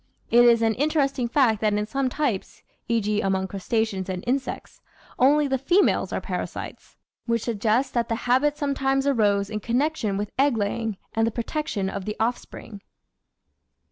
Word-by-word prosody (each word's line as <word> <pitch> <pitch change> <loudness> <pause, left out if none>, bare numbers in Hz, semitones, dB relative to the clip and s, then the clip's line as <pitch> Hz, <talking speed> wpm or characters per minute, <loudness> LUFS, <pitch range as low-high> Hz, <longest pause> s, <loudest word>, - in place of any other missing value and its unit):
It 240 +1 +6
is 230 -1 +5
an 225 0 +3
interesting 275 -2 0
fact 235 -4 +2
that 210 -1 +2
in 210 0 0
some 265 +4 -1
types, 250 -8 -3 0.2
e.g., 215 -3 0
among 190 -1 0
crustaceans 195 0 -2
and 185 -1 -4
insects, 260 +2 -3 0.4
only 290 +3 +4
the 265 -1 0
females 345 +9 +2
are - - -1
parasites, - - -6 0.3
which 230 -1 0
suggests 230 +3 0
that 235 -2 -1
the 230 - 0
habit 275 +4 +2
sometimes 270 -2 0
arose 205 -6 +2
in 215 - -2
connection 240 -3 -1
with 205 0 -3
egg 275 -3 +3
laying 215 0 -2 0.2
and 225 0 +1
the - - -1
protection 235 -3 -3
of 190 0 -5
the 210 - -3
offspring. 225 -2 -4
230 Hz, 160 wpm, -24 LUFS, 210-270 Hz, 0.4 s, It